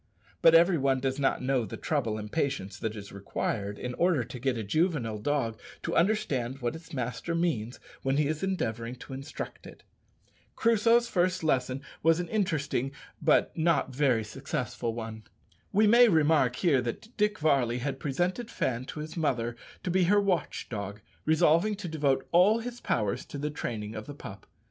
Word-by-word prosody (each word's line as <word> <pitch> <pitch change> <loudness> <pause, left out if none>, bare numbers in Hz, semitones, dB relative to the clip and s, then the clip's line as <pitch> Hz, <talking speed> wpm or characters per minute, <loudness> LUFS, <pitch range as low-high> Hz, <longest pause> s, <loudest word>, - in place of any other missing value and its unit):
But 165 0 +7
every 170 0 +6
one 135 -1 +2
does 135 +1 -1
not 135 -2 +1
know 130 -2 +1
the 105 - -6
trouble 120 -9 -1
and 105 0 -7
patience 135 -11 -2
that 110 -1 -3
is 100 -2 -8
required 100 +1 -3
in 125 0 -4
order 170 -3 +2
to 125 +2 -8
get 130 -1 0
a 110 - -3
juvenile 125 - 0
dog 115 -2 -1 0.2
to - - -2
understand 140 - +1
what 120 0 -2
its 165 +1 -12
master 130 +5 -3
means 140 -9 -1 0.2
when 135 +1 0
he 150 - +3
is 155 +1 -2
endeavouring 120 - -2
to 130 - -10
instruct 135 +2 -7
it. - - -14 0.7
Crusoe's 230 +1 +4
first 185 -3 +1
lesson 130 -2 0 0.2
was 165 +1 +4
an 175 - -3
interesting 155 - 0 0.3
but - - +3
not 165 -3 +2
a - - -9
very 130 -4 +2
successful 125 0 -3
one. 110 -1 -6 0.5
We 215 +2 +4
may 235 +3 +7
remark 155 - +3
here 145 -4 +3
that 125 - -6
Dick 210 0 +1
Varley 135 -6 +2
had 135 +1 -3
presented 175 - -1
Fan 125 - -2
to 150 - -6
his 155 +1 -7
mother 120 -8 0 0.3
to 180 - -1
be 185 0 +3
her 205 +4 +4
watch 190 -5 -1
dog, 100 -2 -5 0.3
resolving 165 +6 +4
to 200 -2 -6
devote 140 -4 0
all 190 +6 +6
his 240 +1 -6
powers 105 -4 0
to - - -7
the 150 +1 -2
training 110 -7 -4
of 110 -1 -7
the 145 - -7
pup. 100 -7 -10
140 Hz, 180 wpm, -29 LUFS, 120-170 Hz, 0.7 s, But